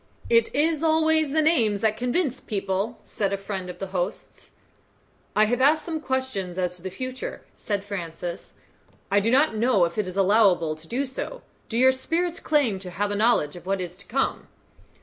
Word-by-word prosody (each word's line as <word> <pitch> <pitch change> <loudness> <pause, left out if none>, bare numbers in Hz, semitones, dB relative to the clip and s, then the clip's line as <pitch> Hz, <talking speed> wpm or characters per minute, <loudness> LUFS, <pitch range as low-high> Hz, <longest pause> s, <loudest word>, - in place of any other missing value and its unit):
"It 230 -1 +5 0.3
always 315 -1 +3
is - - -7
the 315 +1 +2
names 225 -11 +2
that 220 -1 +2
convince 250 +3 -1
people," 200 +2 -2
said 200 -2 -2
a 200 - 0
friend 195 -2 -5
of 180 - -7
the 195 - -4
host's. 180 +1 -4 0.9
"I 215 - +5
have 245 +3 0
asked 300 +4 +4
some 320 -2 -3
questions 260 - -2
as 180 -1 -1
to - - -14
the 190 - -4
future," 255 +6 -6
said 205 -2 -3
Francis. 175 -3 -6 0.6
"I 200 - +5
do 210 +3 +1
not 265 0 +3
know 215 -5 +3
if 170 +5 -4
it 205 - 0
is 185 +1 -6
allowable 190 -5 +4
to 155 +1 -15
do 265 +8 -1
so. 275 - -6 0.3
Do 230 - -2
your 260 +2 +6
spirits 335 +6 -2
claim 275 -11 +1
to 185 -1 -8
have 205 +3 -2
a - - -1
knowledge 210 -9 +2
of 175 +1 -11
what 195 0 0
is 180 -1 -5
to 200 -1 -10
come?" 270 +3 -1
215 Hz, 195 wpm, -25 LUFS, 190-260 Hz, 0.9 s, your